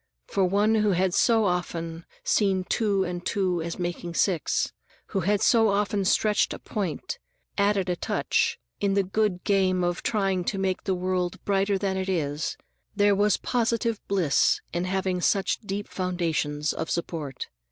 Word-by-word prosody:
For 195 - 0
one 205 +4 +3
who 210 -2 +3
had 180 0 +1
so 225 +1 +4
often 170 -2 -2 0.2
seen 195 -3 +2
two 200 -1 +1
and 175 -1 -4
two 185 -4 0
as 170 +1 -4
making 175 -1 -4
six, 175 -7 +1 0.4
who 195 - -1
had 200 +3 +1
so 225 -2 +5
often 200 -1 +1
stretched 210 +2 +2
a - - -7
point, 200 - -4 0.4
added 200 -2 +2
a 180 - 0
touch, - - 0 0.2
in 200 -1 +1
the 200 - +3
good 195 -1 0
game 190 -3 +2
of 175 0 -1
trying 195 -4 0
to 195 - -1
make 190 -1 -1
the 190 - +1
world 180 -1 -1
brighter 200 0 +2
than 190 -1 -1
it 190 0 -2
is, 150 -4 -1 0.4
there 205 0 +4
was 205 0 +3
positive 230 -2 0
bliss 180 -8 +3
in 175 +1 -1
having 185 -1 -1
such 195 +2 +1
deep 205 -1 -4
foundations 165 -5 -1
of 160 - -4
support. 160 -5 -4
190 Hz, 165 wpm, -26 LUFS, 175-205 Hz, 0.4 s, so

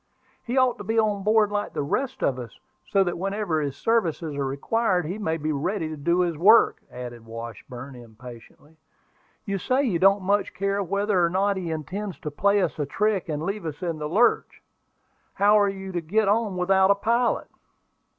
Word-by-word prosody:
"He 245 +3 -3
ought 255 -1 +3
to - - -6
be 225 +3 -2
on 210 -2 +2
board 210 +1 +3
like 205 0 -2
the - - -2
rest 260 - -2
of 130 -2 +1
us, 120 -3 -9 0.3
so 195 -1 +4
that 175 -2 -3
whenever 195 -4 -1
his 140 -1 -4
services 170 -9 0
are 140 - -1
required 180 +7 0
he 185 +7 -4
may 165 -6 -1
be 155 0 -2
ready 160 +4 -2
to 155 - -5
do 170 +5 +1
his 175 -2 0
work," 210 +9 +5
added 120 -2 -8
Washburn, 115 +3 -9
impatiently. 120 +5 -14 0.7
"You 195 -1 -2
say 255 +8 +1
you 200 -11 0
don't 195 +1 +4
much 200 +2 0
care 200 +1 -1
whether 200 0 +1
or 170 - +3
not 195 +3 +1
he 180 -3 -4
intends 180 +5 -5
to 150 - -5
play 200 +6 +2
us - - -3
a 145 - 0
trick 205 +1 0
and 150 0 -3
leave 200 +2 -3
us 155 +4 -7
in 165 -3 -3
the 150 0 -4
lurch. 220 +8 +1 0.7
How 205 +1 +5
are 205 -1 +3
you 190 -1 -6
to 175 -2 -2
get 205 +6 +1
on 205 -2 +1
without 190 +1 +3
a 200 - +5
pilot?" 235 +4 0
190 Hz, 200 wpm, -25 LUFS, 155-205 Hz, 0.7 s, work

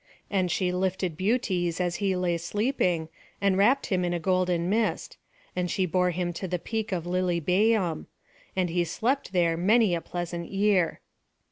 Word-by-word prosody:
And 185 -3 +1
she 180 +1 0
lifted 185 -2 -1
Butes 185 -4 0
as 175 -1 0
he 195 -2 0
lay 180 -1 0
sleeping, 180 -4 0 0.3
and 200 -1 +2
wrapt 240 +8 +3
him 180 -1 +1
in 175 0 0
a - - -1
golden 180 -1 +1
mist; 220 +3 -1 0.4
and 180 -1 -1
she 190 - +1
bore 180 +1 +1
him 175 0 -2
to 190 +3 -5
the 180 0 -1
peak 220 +4 -4
of 175 -3 -1
Lilybæum; 180 +1 +1 0.5
and 185 -2 +1
he 175 0 +1
slept 235 - -1
there 170 -3 +2
many 210 +2 +4
a 170 - -1
pleasant 175 -1 -5
year. 195 -3 +1
180 Hz, 165 wpm, -27 LUFS, 175-200 Hz, 0.5 s, many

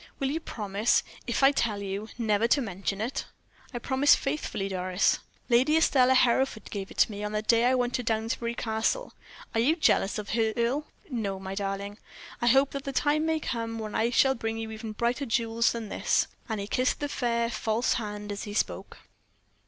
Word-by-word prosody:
"Will 270 0 -1
you 320 - -1
promise, 210 -6 0 0.2
if 240 +3 0
I 270 - +8
tell 225 -7 0
you, 200 +3 -4
never 220 -1 +2
to 280 - +3
mention 195 -4 -3
it?" 240 +5 -3 0.5
"I 245 - -4
promise 265 +4 +4
faithfully, 275 -8 -3
Doris." 185 0 +1 0.3
"Lady 260 +6 +4
Estelle 260 -5 +4
Hereford 255 -2 +2
gave 195 -2 -4
it - - -13
to - - +4
me 205 0 -6
on 210 0 -3
the 215 0 -1
day 230 +1 +3
I 255 +1 +4
went 245 -1 0
to 250 - -1
Downsbury 230 +1 -1
Castle. 225 - -1 0.4
Are 225 - +1
you 280 +8 +3
jealous 230 - +2
of 210 -1 -5
her, 220 -1 +1
Earle?" 255 +6 0 0.2
"No, 200 -6 -2
my 190 0 -6
darling. 200 +1 -4 0.4
I 240 - +1
hope 270 +3 +5
the 275 0 -4
time 300 +3 +1
may 320 0 +1
come 230 -5 -3
when 215 -1 -5
I 225 +1 +2
shall 265 +2 +4
bring 225 -2 -3
you 225 0 -5
even 220 0 -6
brighter 240 +5 -1
jewels 230 0 +1
than 230 -3 -5
this," - - +1 0.2
and 220 -2 -2
he 200 - -3
kissed 255 +5 0
the 290 - -1
fair, 235 -4 0
false 225 +1 0
hand 210 -2 -4
as 200 - -5
he 205 -1 -6
spoke. - - -2
230 Hz, 200 wpm, -28 LUFS, 210-255 Hz, 0.5 s, I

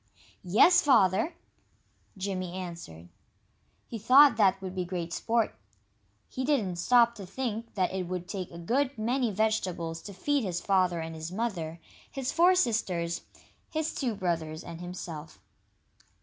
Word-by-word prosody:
"Yes, 330 - +5
Father!" 220 - +3 0.8
Jimmy 185 -2 -3
answered. 170 - -8 0.8
He 230 - -6
thought 260 +4 +7
that 195 -3 +3
would 190 -1 -6
be 185 -1 -2
great 175 -2 -4
sport. 230 +3 0 0.7
He 260 - -4
didn't 225 -11 0
stop 235 +5 +4
to 205 -4 -9
think 230 +1 -4
that 185 -2 0
it 185 -2 -3
would 180 0 -4
take 185 -3 -5
a 170 - -11
good 255 +10 0
many 240 +3 0
vegetables 185 -6 -1
to 200 - -9
feed 285 +7 0
his 180 -4 -2
father 185 -4 +1
and 165 0 -6
his 160 +1 -6
mother, 180 -7 -3 0.3
his 270 -2 -3
four 350 +3 +5
sisters, 185 - 0 0.5
his 315 0 -2
two 245 -6 -2
brothers, 165 -4 -2
and 170 0 -9
himself. 170 -3 -8
190 Hz, 145 wpm, -29 LUFS, 175-235 Hz, 0.8 s, thought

